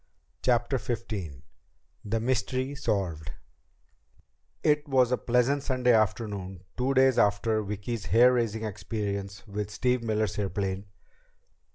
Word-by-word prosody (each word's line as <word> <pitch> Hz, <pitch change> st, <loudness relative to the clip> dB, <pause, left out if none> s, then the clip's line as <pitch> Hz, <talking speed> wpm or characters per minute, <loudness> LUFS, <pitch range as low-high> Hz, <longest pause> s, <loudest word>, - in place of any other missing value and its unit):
CHAPTER 125 Hz, +1 st, +2 dB
XV 95 Hz, -, -5 dB, 0.6 s
The 110 Hz, +2 st, -1 dB
Mystery 130 Hz, +3 st, -1 dB
Solved 95 Hz, -, -2 dB, 1.3 s
It 150 Hz, 0 st, +2 dB
was 130 Hz, -3 st, +3 dB
a 125 Hz, -, +3 dB
pleasant 125 Hz, +4 st, +2 dB
Sunday 125 Hz, -2 st, +2 dB
afternoon, 100 Hz, -4 st, 0 dB
two 130 Hz, +2 st, 0 dB
days 130 Hz, -2 st, +5 dB
after 110 Hz, +1 st, +2 dB
Vicki's 105 Hz, +2 st, -4 dB
hair 120 Hz, +8 st, +6 dB
raising 115 Hz, -3 st, 0 dB
experience 100 Hz, -1 st, -4 dB
with 105 Hz, 0 st, -4 dB
Steve 125 Hz, +4 st, 0 dB
Miller's 110 Hz, -3 st, -1 dB
airplane. 95 Hz, 0 st, -2 dB
110 Hz, 110 wpm, -28 LUFS, 100-125 Hz, 1.3 s, hair